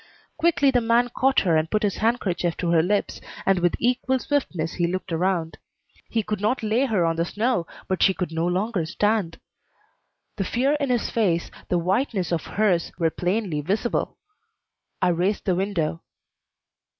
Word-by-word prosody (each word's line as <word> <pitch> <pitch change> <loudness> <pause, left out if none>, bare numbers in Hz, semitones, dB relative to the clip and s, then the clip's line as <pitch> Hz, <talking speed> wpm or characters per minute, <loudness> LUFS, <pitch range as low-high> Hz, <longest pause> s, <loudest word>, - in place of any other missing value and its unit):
Quickly 320 -4 +3
the 245 -2 +2
man 235 +2 +2
caught 270 +2 +2
her 170 -4 +2
and 155 +1 +1
put 215 0 0
his 200 -2 0
handkerchief 195 -7 0
to 170 -2 -1
her 165 -2 +5
lips, 200 +4 -1 0.2
and 195 -1 +3
with 175 0 +2
equal 255 +2 +1
swiftness 185 - -2
he 175 -1 0
looked 185 +1 -4
around. 170 -1 -1 0.5
He 225 -2 0
could 210 -1 -3
not 220 +4 0
lay 220 +5 +2
her 200 -8 +1
on 165 0 0
the 165 - +2
snow, 210 -1 -1 0.2
but 190 -1 -1
she 190 - +4
could 180 -3 -3
no 165 +1 -1
longer 190 +1 0
stand. 205 -1 0 1.0
The 195 - 0
fear 255 +8 +1
in 280 -2 -1
his 245 -2 0
face, 180 -7 0 0.2
the 180 - +2
whiteness 190 +1 0
of 170 -2 -1
hers, 190 -5 +1
were 165 -2 +1
plainly 180 -4 -1
visible. 200 - -1 0.9
I - - +4
raised 180 +4 0
the 185 - +2
window. 175 -4 -1
195 Hz, 175 wpm, -24 LUFS, 170-230 Hz, 1.0 s, her